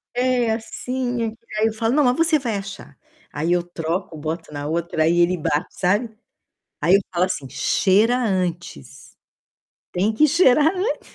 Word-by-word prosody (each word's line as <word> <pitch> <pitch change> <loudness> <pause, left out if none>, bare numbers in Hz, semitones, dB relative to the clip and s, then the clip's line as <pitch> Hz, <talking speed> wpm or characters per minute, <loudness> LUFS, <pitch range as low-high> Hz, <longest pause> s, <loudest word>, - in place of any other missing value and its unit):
É 250 -2 +1
assim 245 +2 -3
é 225 - -1
que 225 - -17 0.2
aí 220 - +3
eu 220 - -2
falo: 225 +2 -1
"Não, 300 - +4
mas 250 +3 +2
você 330 -2 +3
vai 235 -5 -2
achar", 195 -7 -9 0.3
aí 160 +4 -2
eu 175 - +1
troco 170 0 -4
boto 160 +1 -5
na 145 0 -5
outra 165 0 -1
aí 170 +2 +2
ele 175 +1 +3
bate 150 +1 -1
sabe? 205 +6 +1 0.7
Aí 180 +3 +5
eu 200 - +3
falo 180 0 +2
assim: 185 -8 -5
"Cheira 210 - +2
antes" 180 - -2 1.0
"tem 200 +5 0
que 305 +8 +4
cheirar 305 0 +4
antes." 390 +7 -2
195 Hz, 170 wpm, -21 LUFS, 170-245 Hz, 1.0 s, Aí